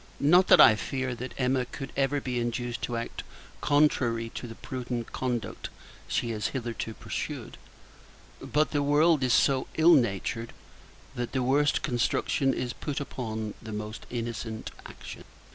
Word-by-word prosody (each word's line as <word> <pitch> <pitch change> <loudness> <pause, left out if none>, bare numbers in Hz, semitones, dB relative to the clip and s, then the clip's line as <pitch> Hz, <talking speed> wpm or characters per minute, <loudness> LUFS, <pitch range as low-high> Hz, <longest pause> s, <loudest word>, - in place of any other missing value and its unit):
Not 175 +6 +5
that - - +7
I 120 - +10
fear, 130 +3 -3
that 125 +2 -7
Emma 130 0 +1
could 135 +2 -7
ever 140 +1 +1
be 125 -2 -2
induced 120 0 -2
to 120 - -2
act 115 - -5 0.4
contrary 130 -6 +2
to 120 - -7
the 115 - -9
prudent 125 -2 -5
conduct 125 -4 -3 0.4
she 120 - -1
has 110 -1 -1
hitherto 115 -2 -4
pursued; - - -5 0.8
but 150 +1 0
the 145 - +1
world 150 +2 +4
is 130 -1 +1
so 135 0 +3
ill 165 +2 +7
natured, 115 - +1 0.6
that 120 -1 -4
the 130 -2 +1
worst 140 +3 +2
construction 130 +2 +1
is 125 -1 -3
put 145 -2 -4
upon 110 -6 -4
the 110 - -8
most 105 +1 -6
innocent 115 -2 -4 0.2
actions. - - -10
125 Hz, 150 wpm, -28 LUFS, 115-140 Hz, 0.8 s, I